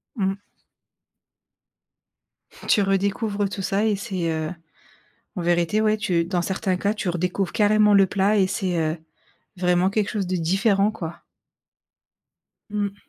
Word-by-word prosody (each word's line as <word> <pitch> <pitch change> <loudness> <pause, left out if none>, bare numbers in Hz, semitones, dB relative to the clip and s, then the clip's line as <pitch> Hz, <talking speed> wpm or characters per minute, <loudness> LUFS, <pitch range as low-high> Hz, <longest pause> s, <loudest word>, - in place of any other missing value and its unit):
Mmh. 195 -2 -1 2.3
Tu 210 - +4
redécouvres 200 +1 0
tout 195 - -5
ça 195 +3 0
et 215 -2 +2
c'est, 190 -4 -3
heu, 160 0 -2 0.9
en 180 - -2
vérité, 175 +4 +1
ouais, 215 0 +2
tu 175 -5 0
dans 175 0 -1
certains 190 +1 -1
cas, 200 +3 0
tu 210 -3 -3
redécouvres 180 +1 -1
carrément 210 0 +4
le 195 -1 +6
plat 200 +3 +1
et 190 - +4
c'est, 185 -2 -2
heu, 160 0 0 0.6
vraiment 180 +1 +2
quelque 205 0 0
chose 205 -3 -2
de 185 +1 -1
différent, 195 +4 +2
quoi. 170 -6 -7 1.5
Mmh. 205 -1 -2
195 Hz, 140 wpm, -23 LUFS, 180-205 Hz, 2.3 s, le